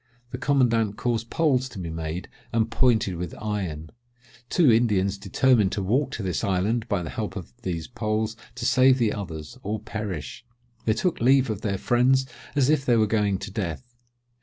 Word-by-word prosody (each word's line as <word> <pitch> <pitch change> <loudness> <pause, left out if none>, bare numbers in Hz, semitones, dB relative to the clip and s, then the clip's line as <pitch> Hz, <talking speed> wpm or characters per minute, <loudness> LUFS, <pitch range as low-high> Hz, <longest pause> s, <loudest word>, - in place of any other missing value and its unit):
The - - -5
commandant 115 -7 +2
caused 115 -1 -1
poles 130 -5 +1
to 120 - -11
be 85 -3 -4
made 80 +2 -4 0.2
and 115 0 +1
pointed 110 -9 +2
with 90 -1 -5
iron: 90 -8 -4 0.6
two 160 -8 +5
Indians 105 -4 +2
determined 105 +1 +3
to 100 - -2
walk 130 +8 +1
to 110 - -4
this 90 -4 -2
island 105 +5 0
by 90 -4 0
the 80 - -6
help - - -4
of - - -8
these 85 -3 -3
poles 110 -2 -2 0.2
to 125 -1 -4
save 130 +1 +5
the 115 -4 +1
others, 80 -8 -7
or 105 +2 -3
perish. 105 -1 -5 0.4
They 110 - +3
took 180 -3 -1
leave 130 0 +4
of 105 -1 -5
their 100 -2 -1
friends 130 +5 +3 0.3
as 140 -3 +3
if 150 -2 +3
they 120 -3 +3
were 110 - +4
going 105 -2 +1
to 100 +2 -7
death. 105 +5 -4
110 Hz, 185 wpm, -25 LUFS, 95-125 Hz, 0.6 s, two